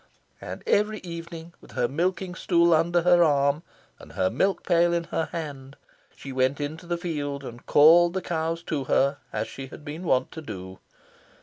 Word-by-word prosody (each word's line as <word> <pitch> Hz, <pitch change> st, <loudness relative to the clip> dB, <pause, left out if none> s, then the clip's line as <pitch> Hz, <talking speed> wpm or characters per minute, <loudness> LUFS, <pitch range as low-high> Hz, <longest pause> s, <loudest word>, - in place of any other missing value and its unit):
And -, -, -7 dB
every 210 Hz, +1 st, +2 dB
evening, 170 Hz, -1 st, -8 dB
with -, -, -16 dB
her 120 Hz, -, +1 dB
milking 180 Hz, +5 st, -1 dB
stool 170 Hz, -2 st, +3 dB
under 170 Hz, +2 st, +2 dB
her 175 Hz, 0 st, +6 dB
arm, 140 Hz, -1 st, +2 dB, 0.4 s
and -, -, -14 dB
her 95 Hz, 0 st, 0 dB
milk 190 Hz, -2 st, 0 dB
pail 170 Hz, -1 st, +3 dB
in 170 Hz, 0 st, 0 dB
her 165 Hz, -1 st, -2 dB
hand, 145 Hz, -4 st, -7 dB, 0.4 s
she 135 Hz, -, -9 dB
went 130 Hz, +2 st, +1 dB
into 155 Hz, +4 st, -5 dB
the 175 Hz, 0 st, -1 dB
field 145 Hz, -5 st, -4 dB
and 120 Hz, -2 st, -9 dB
called 170 Hz, +4 st, +6 dB
the 190 Hz, -, -1 dB
cows 165 Hz, 0 st, -2 dB
to 145 Hz, -5 st, -3 dB
her, 140 Hz, +2 st, +2 dB
as -, -, -2 dB
she 135 Hz, -1 st, -8 dB
had 145 Hz, -, -12 dB
been 155 Hz, +3 st, -6 dB
wont 130 Hz, -7 st, +1 dB
to 160 Hz, -, -8 dB
do. 95 Hz, -8 st, -8 dB
160 Hz, 185 wpm, -26 LUFS, 140-170 Hz, 0.4 s, her